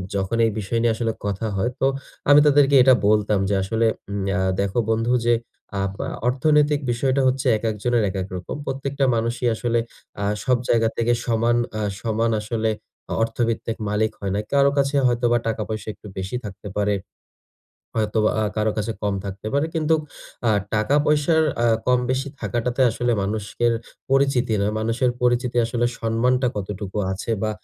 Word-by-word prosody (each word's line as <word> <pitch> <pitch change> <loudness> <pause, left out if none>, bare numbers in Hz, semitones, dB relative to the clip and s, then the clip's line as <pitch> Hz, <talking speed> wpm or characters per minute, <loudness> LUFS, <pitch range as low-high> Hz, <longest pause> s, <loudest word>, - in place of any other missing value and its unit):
যখন 100 +3 -1
এই 110 - +1
বিষয় 110 +3 -1
নিয়ে 115 -1 +3
আসলে 115 0 -1
কথা 100 +2 -2
হয়, 105 +5 +1
তো 135 - +3 0.4
আমি 145 0 +9
তাদেরকে 145 -1 +5
এটা 130 0 +7
বলতাম 105 -1 +3
যে, 100 - +2
আসলে, 110 +4 0 0.3
উম 100 -1 -2 0.2
আ - - +1 0.2
"দেখো 100 +3 0
বন্ধু 115 +2 +1
যে, 120 - +4 0.5
আপ 100 0 -1 0.4
অর্থনৈতিক 150 +3 +3
বিষয়টা 130 +3 +1
হচ্ছে 130 +1 0
একেকজনের 115 +2 0
একেক 95 -1 -3
রকম। 90 -1 -5
প্রত্যেকটা 135 +1 -1
মানুষই 120 +2 -1
আসলে 120 +1 0 0.4
আ - - -1 0.2
সব 130 -2 +3
জায়গা 115 -1 +3
থেকে 120 +1 +2
সমান 115 +1 +2 0.2
অ্যা 110 - -3 0.2
সমান 115 0 0
আসলে 110 +1 -1 0.4
আ - - 0
অর্থভিত্তিক 115 0 -1
মালিক 105 +1 +1
হয় 100 -1 -3
না। - - 0
কারো 140 0 +5
কাছে 140 +1 +1
হয়তোবা 120 0 +2
টাকা 110 -1 -1
পয়সা 110 0 -4
একটু 105 - -14
বেশি 95 +5 -4
থাকতে 105 0 -8
পারে। 105 0 +1 1.0
হয়তোবা 110 0 +2
আ - - +1
কারো 110 0 +1
কাছে 110 +1 -1
কম 100 -1 0
থাকতে 100 +1 -7
পারে। 145 +2 +2
কিন্তু 160 0 +2 0.5
আ - - +5 0.2
টাকা 110 +7 +2
পয়সার 150 +2 +3 0.2
আ - - +4 0.2
কম 125 0 +4
বেশি 130 +2 -1
থাকাটাতে 120 +2 -2
আসলে 120 +2 0
মানুষের 110 +3 -1 0.4
পরিচিতি 135 -4 +2
না। - - +1
মানুষের 115 +3 +1
পরিচিতি 125 0 +1
আসলে 120 +1 0
সম্মানটা 125 +3 +1
কতটুকু 100 0 -4
আছে 95 +4 -5
বা, 110 - +1
115 Hz, 165 wpm, -22 LUFS, 105-125 Hz, 1.0 s, আমি